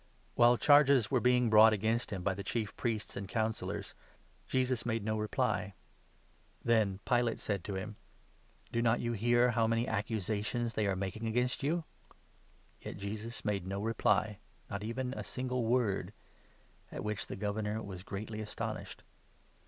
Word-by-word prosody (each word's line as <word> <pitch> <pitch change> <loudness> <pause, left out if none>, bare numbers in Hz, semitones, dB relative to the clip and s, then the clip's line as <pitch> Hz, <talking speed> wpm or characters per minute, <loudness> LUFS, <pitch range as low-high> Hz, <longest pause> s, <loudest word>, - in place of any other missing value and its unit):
While 120 +1 +5
charges 140 -5 +5
were 130 - +4
being 125 -1 +3
brought 110 +1 +8
against 110 +3 0
him 95 -4 -4
by 95 - +1
the 100 +2 -6
Chief 110 0 -2
Priests 110 -3 -2
and 100 -1 -5
Councillors, 110 0 -2 0.5
Jesus 130 -2 +1
made 115 -2 -1
no 110 0 0
reply. 105 -2 -1 0.9
Then 110 -5 +3
Pilate 120 -2 +2
said 100 -4 -2
to 100 - -3
him: 105 +3 -5 0.4
" - - -33
Do 115 - +1
not 115 0 +3
you 120 0 -1
hear 120 +3 +3
how 115 -1 +2
many 115 +2 +1
accusations 110 +2 -1
they 105 -1 0
are 95 - +1
making 100 +4 -3
against 125 +3 0
you? 160 +5 0 0.5
" - - -33
Yet - - -7
Jesus 105 +4 -6
made 100 -3 -1
no 100 +1 -3
reply 105 -1 +1
— - - -33
not 100 0 -3
even 125 +3 -3
a - - -5
single 125 -2 -2
word; 110 -5 +1 0.8
at - - -5
which 105 -1 -3
the - - -5
Governor 105 +1 -2
was 95 -3 -7
greatly 105 +3 -5
astonished. 105 - -5
110 Hz, 165 wpm, -33 LUFS, 105-120 Hz, 0.9 s, brought